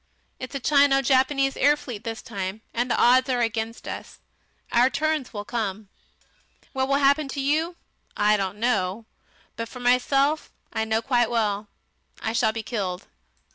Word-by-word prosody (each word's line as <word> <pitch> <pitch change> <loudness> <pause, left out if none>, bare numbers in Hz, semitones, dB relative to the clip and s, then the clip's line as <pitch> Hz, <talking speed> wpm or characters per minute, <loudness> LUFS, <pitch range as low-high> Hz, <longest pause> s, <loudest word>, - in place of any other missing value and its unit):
It's 255 +2 -7
a - - -1
Chino 280 0 +4
Japanese 270 +1 +2
air 290 +2 +4
fleet 230 -7 -8
this 225 -1 -5
time, 195 +2 -5
and 240 +2 -1
the - - +1
odds 255 +2 +5
are 250 -2 +1
against 225 0 -2
us. - - -7 0.5
Our 245 +2 +4
turns 310 -1 -1
will 205 -1 -6
come. 215 -4 -3 0.8
What 265 0 0
will 275 - +2
happen 280 +1 +3
to 275 - -5
you 310 +5 0 0.4
I 210 0 +4
don't 195 -1 -2
know, 215 -2 0 0.5
but 230 0 -4
for 250 - -10
myself, 275 +5 +2 0.2
I 220 -1 0
know 220 +1 0
quite 240 -2 +2
well; 210 -3 0 0.5
I 220 - -2
shall 230 -1 +2
be 225 0 -5
killed." 195 -6 -3
240 Hz, 165 wpm, -25 LUFS, 220-275 Hz, 0.8 s, odds